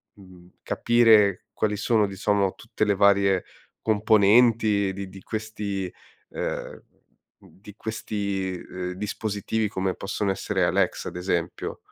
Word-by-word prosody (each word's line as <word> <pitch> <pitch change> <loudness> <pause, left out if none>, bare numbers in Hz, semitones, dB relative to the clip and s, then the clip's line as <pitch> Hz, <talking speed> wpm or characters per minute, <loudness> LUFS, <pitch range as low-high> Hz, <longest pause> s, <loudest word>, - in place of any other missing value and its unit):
mhmm, 90 -3 -16 0.2
capire 110 -5 +4
quali 105 -1 0
sono, 110 0 +2
diciamo, 100 0 0
tutte 110 - -4
le 105 -1 +2
varie 100 -1 +4 0.4
componenti 110 -1 +4
di 100 0 -6
di 95 0 -12
questi, 105 -4 -4 0.4
uhm, - - -5 0.6
di 105 +2 -15
questi, 100 -4 -3
uhm, 90 0 -4
dispositivi 105 +2 -2
come 95 -2 -2
possono 100 0 -2
essere 95 - -1
Alexa - - 0
ad - - -9
esempio? 90 -1 -2
100 Hz, 115 wpm, -25 LUFS, 95-110 Hz, 0.6 s, capire